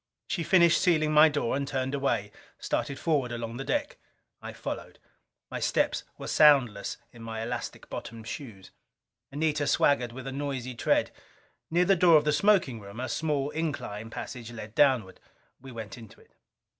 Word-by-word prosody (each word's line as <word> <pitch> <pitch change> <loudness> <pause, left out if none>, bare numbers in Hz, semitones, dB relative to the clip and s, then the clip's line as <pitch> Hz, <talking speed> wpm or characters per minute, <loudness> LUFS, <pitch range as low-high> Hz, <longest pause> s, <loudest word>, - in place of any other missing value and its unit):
She 175 - -2
finished 170 0 +4
sealing 155 -4 +3
my 155 +1 +7
door 145 -5 -1
and 140 0 -2
turned 135 -1 -2
away; 120 -7 -1 0.3
started 140 - -2
forward 145 -7 0
along 115 0 -5
the 135 - -4
deck. 290 - -2 0.4
I - - -7
followed. - - -6 0.5
My - - -3
steps - - +1
were - - -8
soundless 130 -9 +4 0.2
in 120 - -13
my 110 0 -5
elastic 120 +1 -5
bottomed 115 -1 -8
shoes. 110 -11 -8 0.6
Anita 150 0 0
swaggered 125 -4 +2
with 130 +2 -9
a 135 - -4
noisy 135 -2 -4
tread. 115 - +1 0.6
Near 175 +2 +3
the 195 +1 +4
door 170 -2 +6
of 150 - +1
the 150 - +2
smoking 185 - +3
room 100 +2 -10
a 130 - -2
small 145 -2 -1
incline 140 -9 -4
passage 120 0 -7
led 110 -2 -9
downward. 130 -8 +2 0.4
We 135 0 -10
went 110 -1 -8
into 115 -3 -14
it. - - -23
135 Hz, 170 wpm, -28 LUFS, 115-150 Hz, 0.6 s, my